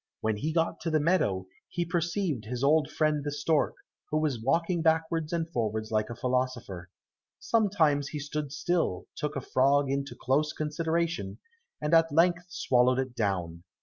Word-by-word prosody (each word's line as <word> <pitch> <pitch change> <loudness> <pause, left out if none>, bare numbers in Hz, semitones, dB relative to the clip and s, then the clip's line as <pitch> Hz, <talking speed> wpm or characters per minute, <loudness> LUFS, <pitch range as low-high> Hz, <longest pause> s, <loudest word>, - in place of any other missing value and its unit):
When 110 -1 0
he 155 +9 -2
got 165 0 0
to 165 - -3
the 155 -1 +2
meadow, 145 - +1 0.2
he 175 -1 -2
perceived 170 - -1
his 125 +3 -4
old 150 +1 +4
friend 155 -1 +1
the 145 - -2
stork, 145 +1 +1 0.3
who 155 - 0
was 150 -7 0
walking 165 +7 +1
backwards 160 -1 +1
and 165 -1 -1
forwards 110 -2 -2
like 110 0 0
a 120 - -5
philosopher. 125 -8 -2 0.5
Sometimes 165 -11 +2
he 150 - -5
stood 145 0 -4
still, 155 - -1
took 150 - -3
a 140 - -2
frog 140 +2 +2
into 140 0 -2
close 150 +4 +1
consideration, 165 +2 -2 0.4
and 150 +2 -1
at 165 0 +5
length 175 +3 +3
swallowed 125 -6 +2
it 130 -2 -2
down. 90 -7 -2
150 Hz, 165 wpm, -29 LUFS, 125-165 Hz, 0.5 s, at